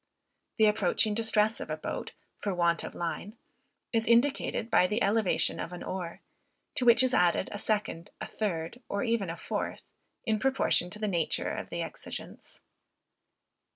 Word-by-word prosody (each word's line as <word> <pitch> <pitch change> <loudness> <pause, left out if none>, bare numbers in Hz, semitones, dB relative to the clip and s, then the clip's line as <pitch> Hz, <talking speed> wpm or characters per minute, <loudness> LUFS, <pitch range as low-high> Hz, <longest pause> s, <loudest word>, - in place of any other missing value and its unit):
The 220 - +6
approaching 210 0 +3
distress 220 0 +2
of - - -6
a - - -2
boat, - - -5 0.3
for 200 -3 -2
want 170 -1 +2
of - - -7
line, 190 +6 -4 0.6
is 225 -1 +1
indicated 235 -1 +2
by 180 - +5
the 210 +5 0
elevation 205 -1 +2
of 165 - -4
an 175 - -7
oar, 175 -3 -5 0.5
to 255 - 0
which 235 +1 +7
is 255 -1 +1
added 180 -2 +3
a 205 - -4
second, 205 -6 -1
a - - -4
third, 185 +1 -3
or 200 - -1
even 230 -6 0
a 165 - -4
fourth, - - -3 0.4
in 220 -2 +1
proportion 265 -8 +2
to 210 - -4
the 215 0 -2
nature 170 -5 0
of - - -5
the - - -2
exigence. - - -8
210 Hz, 165 wpm, -30 LUFS, 180-225 Hz, 0.6 s, which